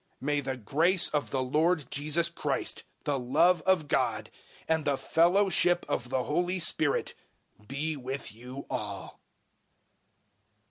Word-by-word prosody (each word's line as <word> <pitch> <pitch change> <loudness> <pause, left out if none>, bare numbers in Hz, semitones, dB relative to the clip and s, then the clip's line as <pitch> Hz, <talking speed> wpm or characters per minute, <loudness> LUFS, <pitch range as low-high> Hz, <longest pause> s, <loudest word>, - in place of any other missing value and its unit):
013:014 - - -44
May 145 -1 0
the 135 -1 -4
grace 160 - +2
of 150 -1 -1
the 130 -1 -1
Lord 155 +4 +1
Jesus 155 +4 +2
Christ, - - -2 0.2
the 140 -2 -1
love 160 +8 +3
of 180 -5 +3
God, - - 0 0.4
and 160 -1 +1
the 140 -2 0
fellowship 175 +1 +3
of 120 -1 -2
the 130 -1 0
Holy 175 +6 0
Spirit, 160 -4 +1 0.5
be 150 +5 -3
with 135 -2 -5
you 125 +5 -9
all. 100 -2 -6
150 Hz, 135 wpm, -29 LUFS, 130-170 Hz, 0.5 s, love